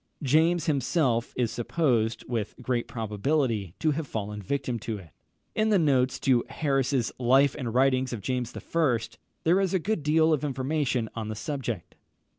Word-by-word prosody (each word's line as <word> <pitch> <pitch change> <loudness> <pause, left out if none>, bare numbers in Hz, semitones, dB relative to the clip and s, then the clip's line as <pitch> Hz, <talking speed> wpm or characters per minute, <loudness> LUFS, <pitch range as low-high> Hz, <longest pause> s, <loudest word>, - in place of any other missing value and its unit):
James 160 +4 +3
himself 135 -4 +1
is 120 -3 +1
supposed, 120 -4 0
with 115 -4 -3
great 125 -1 -1
probability, 110 - -1
to 155 - +1
have 150 0 -3
fallen 105 -2 -4
a - - -13
victim 125 0 -2
to 110 -1 -4
it. 90 -6 -13 0.4
In 220 0 +1
the 210 - +4
notes 130 -6 +2
to 130 -4 +3
Harris's 135 -4 0
Life 135 +3 +4
and 125 -6 -3
Writings 130 +1 +2
of 115 -4 -4
James 125 +2 -2
I., 150 -8 +1 0.4
there 175 +4 +4
is 190 -1 0
a - - +5
good 200 +1 -1
deal 155 +2 +3
of 150 - 0
information 135 -3 -1
on 110 -2 -4
the 110 - -4
subject. 120 - -4
130 Hz, 170 wpm, -27 LUFS, 115-150 Hz, 0.4 s, a